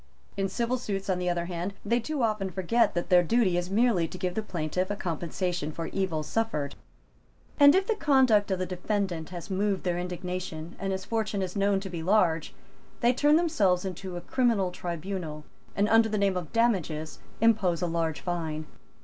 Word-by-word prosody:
In 195 Hz, -1 st, -1 dB
civil 240 Hz, +3 st, -1 dB
suits, 195 Hz, -4 st, -2 dB
on 180 Hz, -, 0 dB
the 180 Hz, 0 st, 0 dB
other 175 Hz, -1 st, -1 dB
hand, 175 Hz, +3 st, -4 dB
they 235 Hz, +3 st, +2 dB
too 270 Hz, +3 st, -2 dB
often 215 Hz, -4 st, 0 dB
forget 190 Hz, +5 st, +1 dB
that 175 Hz, -, -2 dB
their 180 Hz, -1 st, +7 dB
duty 190 Hz, 0 st, +2 dB
is 175 Hz, +1 st, -1 dB
merely 205 Hz, -5 st, +2 dB
to 185 Hz, -, -9 dB
give 180 Hz, -1 st, -2 dB
the 220 Hz, -, -1 dB
plaintiff 180 Hz, -2 st, -2 dB
a 205 Hz, -, -1 dB
compensation 175 Hz, -2 st, -3 dB
for 165 Hz, +2 st, -5 dB
evil 185 Hz, -6 st, -1 dB
suffered; 150 Hz, -8 st, -1 dB, 0.9 s
and, 285 Hz, +2 st, +8 dB
if 380 Hz, 0 st, +3 dB
the 450 Hz, -, +1 dB
conduct 260 Hz, -, +3 dB
of 190 Hz, -, +1 dB
the 185 Hz, -, -2 dB
defendant 180 Hz, -2 st, -2 dB
has 180 Hz, +2 st, -7 dB
moved 195 Hz, 0 st, 0 dB
their 175 Hz, -1 st, 0 dB
indignation 180 Hz, -2 st, -5 dB
and 195 Hz, -1 st, -2 dB
his 190 Hz, -1 st, -3 dB
fortune 215 Hz, -3 st, -1 dB
is 180 Hz, -1 st, -5 dB
known 200 Hz, -1 st, +2 dB
to 195 Hz, -, -6 dB
be 170 Hz, -2 st, -4 dB
large, 170 Hz, -3 st, +2 dB, 0.5 s
they 240 Hz, +1 st, +4 dB
turn 295 Hz, +4 st, +4 dB
themselves 205 Hz, -, +2 dB
into 185 Hz, -1 st, -5 dB
a -, -, -5 dB
criminal 220 Hz, -3 st, +1 dB
tribunal, 175 Hz, -3 st, -5 dB, 0.3 s
and, 200 Hz, +1 st, +2 dB
under 225 Hz, 0 st, +5 dB
the 215 Hz, -, -1 dB
name 200 Hz, -2 st, +2 dB
of 175 Hz, -4 st, -4 dB
damages, 175 Hz, -10 st, 0 dB, 0.2 s
impose 200 Hz, -7 st, +3 dB
a -, -, +2 dB
large 165 Hz, -2 st, -1 dB
fine. 160 Hz, -3 st, -3 dB
190 Hz, 190 wpm, -28 LUFS, 175-215 Hz, 0.9 s, and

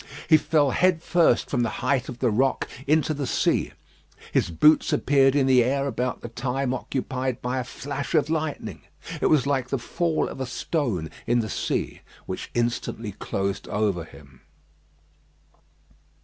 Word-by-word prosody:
He 155 Hz, -, +7 dB
fell 145 Hz, -2 st, +2 dB
head 180 Hz, +2 st, +2 dB
first 170 Hz, -10 st, +3 dB
from 125 Hz, -, 0 dB
the 115 Hz, -, +1 dB, 0.2 s
height 130 Hz, -1 st, +1 dB
of 125 Hz, -, -6 dB
the 125 Hz, -2 st, +1 dB
rock 130 Hz, +5 st, +1 dB, 0.2 s
into 155 Hz, +1 st, +3 dB
the 140 Hz, -3 st, -3 dB
sea. -, -, +1 dB, 0.6 s
His -, -, +1 dB
boots 150 Hz, -, +4 dB
appeared 135 Hz, -1 st, +3 dB
in 140 Hz, -2 st, +3 dB
the 130 Hz, -2 st, +5 dB
air 135 Hz, +3 st, 0 dB
about 125 Hz, -2 st, -2 dB
the -, -, -6 dB
time 125 Hz, +2 st, -2 dB
occupied 130 Hz, 0 st, -3 dB
by 125 Hz, +1 st, -2 dB
a -, -, -2 dB
flash 140 Hz, +5 st, -5 dB
of 150 Hz, -2 st, +3 dB
lightning. 155 Hz, -2 st, -3 dB, 0.4 s
It -, -, +3 dB
was 150 Hz, -4 st, +3 dB
like 135 Hz, -3 st, 0 dB
the 135 Hz, -, 0 dB
fall 165 Hz, +6 st, -1 dB
of -, -, -7 dB
a 130 Hz, -, -2 dB
stone 120 Hz, -, -2 dB, 0.2 s
in 120 Hz, 0 st, +3 dB
the 110 Hz, -, -4 dB
sea, -, -, -2 dB, 0.2 s
which -, -, -5 dB
instantly 120 Hz, -2 st, -2 dB
closed 100 Hz, 0 st, -3 dB
over 100 Hz, -5 st, 0 dB
him. 70 Hz, -5 st, -16 dB
130 Hz, 165 wpm, -25 LUFS, 120-145 Hz, 0.6 s, He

